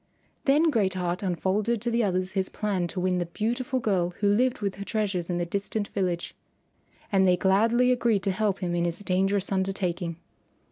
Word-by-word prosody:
Then 305 +4 +4
Great 200 -7 +1
Heart 180 0 -2
unfolded 195 +5 0
to 240 - 0
the 235 0 +2
others 185 -2 0
his 190 -1 -1
plan 195 -5 -1
to 180 - -5
win 180 0 +1
the 175 - -2
beautiful 245 +8 -1
girl 180 -6 0
who 205 - +2
lived 245 +5 +2
with 200 -2 -3
her 200 - -5
treasures 200 -5 -2
in 175 - 0
the 175 - -1
distant 200 +3 -3
village. 180 -3 -2 0.8
And 190 -2 +4
they 180 0 +4
gladly 225 +7 +3
agreed 235 -6 +2
to 195 - +1
help 200 0 -1
him 175 -1 -1
in 170 0 +1
his 170 -1 -1
dangerous 195 0 0
undertaking. 190 -3 -1
195 Hz, 190 wpm, -27 LUFS, 180-215 Hz, 0.8 s, Then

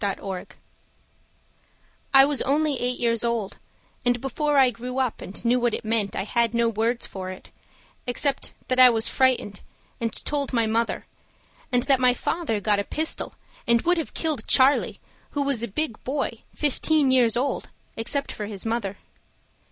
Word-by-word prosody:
Nellie 200 -1 0
Clark 190 -2 -7 1.5
I 270 0 +8
was 285 -1 0
only 290 0 +1
eight 250 0 -1
years 230 -1 +1
old; 235 -4 -2 0.4
And 245 0 +2
before 290 +3 -1
I 260 -2 +6
grew 250 +2 -6
up 255 -4 -1
and 200 +4 -8
knew 245 +2 +3
what 240 -2 +1
it - - -7
meant 215 -3 0
I - - -1
had 235 +2 0
no 235 0 +3
words 230 +2 -1
for 185 -1 -6
it, 185 - -10 0.6
except 270 +3 0 0.2
That 255 0 0
I 255 -1 +10
was 225 -2 +2
frightened 255 -6 +1 0.4
and 230 -1 -1
told 285 -2 -1
my 230 -2 +2
Mother; 225 +1 -1 0.7
And 245 -1 +2
that 270 -3 +3
my 250 -1 +4
Father 310 -11 -2
got 205 0 +1
a - - 0
pistol 315 +9 -2 0.3
And 235 -1 +3
would 350 0 +2
have 320 - -6
killed 305 -9 -2
Charlie, 265 +2 +4 0.4
who 285 - +2
was 275 -5 0
a 235 - -1
big 235 +2 -4
boy, 265 -4 -2 0.2
Fifteen 295 -1 +2
years 240 -3 +3
old, 275 +3 -2 0.3
except 255 +5 +1
for 210 - -5
his 205 -1 -7
Mother. 225 -4 -2
245 Hz, 175 wpm, -24 LUFS, 225-275 Hz, 1.5 s, I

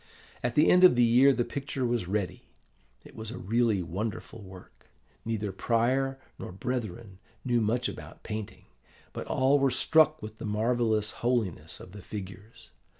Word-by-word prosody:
At 120 0 -2
the 150 - +5
end 180 +1 +5
of 180 - +8
the 120 - +4
year 125 +4 +6
the 120 -3 0
picture 135 -2 -4
was 120 -6 -1
ready. 100 -1 -2 0.6
It - - -14
was 110 -1 -6
a 125 - -6
really 110 -2 +1
wonderful 105 +5 -5
work. 95 -2 -14 0.4
Neither 110 -3 -2
prior 125 +6 0 0.2
nor - - -7
brethren 110 -2 -5 0.3
knew 120 -2 +2
much 115 +3 0
about - - -9
painting; 105 -1 -6 0.5
but - - -6
all 135 +2 +3
were 135 0 +3
struck 155 +3 +3
with 110 -3 -9
the - - -7
marvellous 110 0 0
holiness 120 -7 -2
of 90 - -12
the 100 +1 -10
figures. 100 - -10
115 Hz, 160 wpm, -28 LUFS, 105-125 Hz, 0.6 s, of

